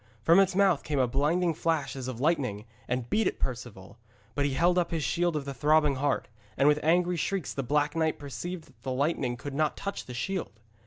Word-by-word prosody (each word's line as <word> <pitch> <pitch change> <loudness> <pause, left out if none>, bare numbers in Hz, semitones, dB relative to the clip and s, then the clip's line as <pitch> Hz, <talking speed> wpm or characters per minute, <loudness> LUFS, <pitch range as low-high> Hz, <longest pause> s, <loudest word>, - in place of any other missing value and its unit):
From 165 +8 +6
its 190 -2 +3
mouth 190 -6 +4
came 150 -2 -3
a 130 -2 +3
blinding 160 +7 +1
flash 160 -4 -1
as 130 -2 -5
of 125 -3 -5
lightning 130 -9 0 0.2
and 125 -1 -2
beat 215 - +2
at - - -2
Perceval, 115 -5 -6 0.3
but 145 0 0
he 140 -2 -1
held 175 +4 +3
up 175 - 0
his 165 -2 -2
shield 175 +1 0
of 145 -2 -2
the 140 - -4
Throbbing 150 +1 +3
Heart, 140 +1 0 0.3
and 140 - +4
with 150 0 +4
angry 175 +2 +2
shrieks 190 +2 -2
the 135 - -2
Black 145 +3 0
Knight 160 -1 +1
perceived 165 +5 -6
that - - -23
the 130 - -4
lightning 130 -3 0
could 140 +3 -7
not 155 +2 0
touch 200 0 -5
the 125 - -7
shield. 165 - -3
150 Hz, 220 wpm, -28 LUFS, 130-170 Hz, 0.3 s, From